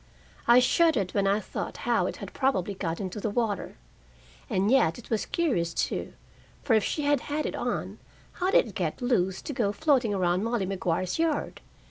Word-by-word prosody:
I 235 +1 +7
shuddered 255 - +3
when 200 -1 +2
I 200 +2 +3
thought - - -5
how - - +2
it - - -5
had - - -8
probably 260 -8 0
got 170 -4 -3
into 190 +1 -4
the 215 - -2
water. 215 -2 -2 0.7
And 195 +3 +1
yet 210 -12 +3
it 240 - -13
was 220 - 0
curious, 205 - 0
too, - - -2 0.5
for 260 - +2
if 220 -2 +4
she 300 - -2
had 290 -1 +3
had 300 +1 -1
it - - -2
on, - - -3 0.3
how 365 +1 -1
did 390 - +5
it 210 - -10
get 170 -4 -2
loose 190 -7 0
to 290 - -5
go 220 -5 +1
floating 265 -3 +2
around 185 -1 +1
Molly 230 -3 0
Maguire's 185 - -1
yard? 325 -3 -1
215 Hz, 190 wpm, -27 LUFS, 190-270 Hz, 0.7 s, I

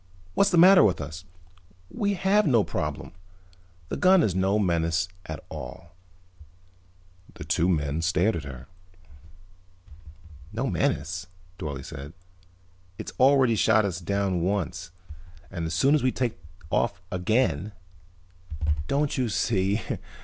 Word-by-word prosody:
"What's 200 - +3
the 180 - +2
matter 185 0 +8
with 95 -5 +2
us? 80 +3 -7 0.7
We 200 -1 -1
have 195 +2 +2
no 120 -7 +4
problem. - - -4 0.8
The - - -3
gun 185 -1 +5
is 100 - +1
no 95 +3 +1
menace 85 -3 +1 0.2
at 80 -2 -6
all." 85 +1 -9 1.4
The - - -8
two 85 +3 +1
men 75 -2 0
stared 90 +6 +2
at 80 - -4
her. 65 -2 -9 1.9
"No 115 +5 -2
menace?" 85 +1 -1 0.3
Dorle 70 -3 -5
said. 70 +3 -8 0.8
"It's - - -7
already 130 -2 +5
shot 110 0 +3
us 90 -3 -3
down 95 0 -1
once. 90 -2 -2 0.6
And 85 -3 -3
as 80 - -3
soon 135 - +3
as 155 - +3
we 130 +1 +2
take 120 -7 -2 0.3
off - - 0
again 95 - 0 0.5
" 80 -4 -5
"Don't 140 -1 0
you 125 -3 0
see?" 100 0 0
95 Hz, 130 wpm, -26 LUFS, 80-120 Hz, 1.9 s, matter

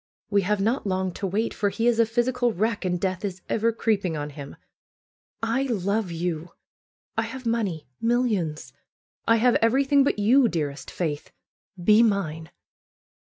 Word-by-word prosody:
We 200 0 +4
have 205 +2 0
not 225 +3 0
long 190 -1 0
to 195 - -3
wait, 215 +5 -1
for 205 - 0
he 225 +3 -2
is 240 -1 +3
a 230 - +5
physical 240 +1 +1
wreck, 215 +1 -1
and 180 -1 0
death 185 +1 -2
is 185 -3 -4
ever 225 +1 +1
creeping 210 -7 0
on 145 0 -4
him. 140 -1 -9 0.9
I 230 +4 +1
love 205 -2 -1
you! 170 0 -3 0.6
I - - +2
have 260 -1 -6
money 210 -9 -1
— - - -46
millions! 175 - -1 0.5
I 230 - +6
have 240 +2 +4
everything 270 +5 +3
but 275 - +1
you, 240 +5 +5
dearest 150 -5 -3
Faith. 150 -4 -3 0.5
Be 210 +5 +5
mine!" 165 -8 0
205 Hz, 165 wpm, -25 LUFS, 175-230 Hz, 0.9 s, I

